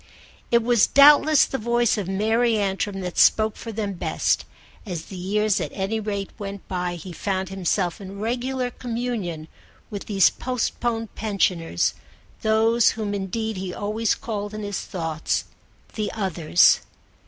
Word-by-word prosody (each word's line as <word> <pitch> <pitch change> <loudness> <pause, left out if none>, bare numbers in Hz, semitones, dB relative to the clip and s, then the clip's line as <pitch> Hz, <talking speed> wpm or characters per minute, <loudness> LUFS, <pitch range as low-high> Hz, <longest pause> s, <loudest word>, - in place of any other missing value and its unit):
It 235 -1 +3
was 235 -2 +4
doubtless 290 +1 +7
the 265 - -4
voice 235 +1 +2
of 205 -5 -3
Mary 220 +4 +2
Antrim 195 0 -1
that 180 -2 -3
spoke 215 -1 +4
for 230 - -7
them 210 -2 -3
best; 175 - 0 0.4
as 175 -6 -5
the 195 - -10
years 205 +3 0
at - - -3
any 200 +3 -1
rate 200 -2 -4
went 200 -1 -7
by 180 -1 -2
he 175 +2 -8
found 190 +1 -2
himself 190 -1 -1
in 195 0 -8
regular 250 +3 -2
communion 230 -11 -4 0.4
with 205 -1 -6
these 195 -3 +4
postponed 235 -2 -2
pensioners, 185 - 0 0.5
those 225 +2 +3
whom 210 -2 -2
indeed 205 +2 -3
he 185 -1 -5
always 215 +2 0
called 205 -2 -5
in 215 - -5
his 205 -2 -3
thoughts 165 -4 -2 0.5
the 215 -1 -2
Others. 175 -5 +3
205 Hz, 145 wpm, -24 LUFS, 190-225 Hz, 0.5 s, doubtless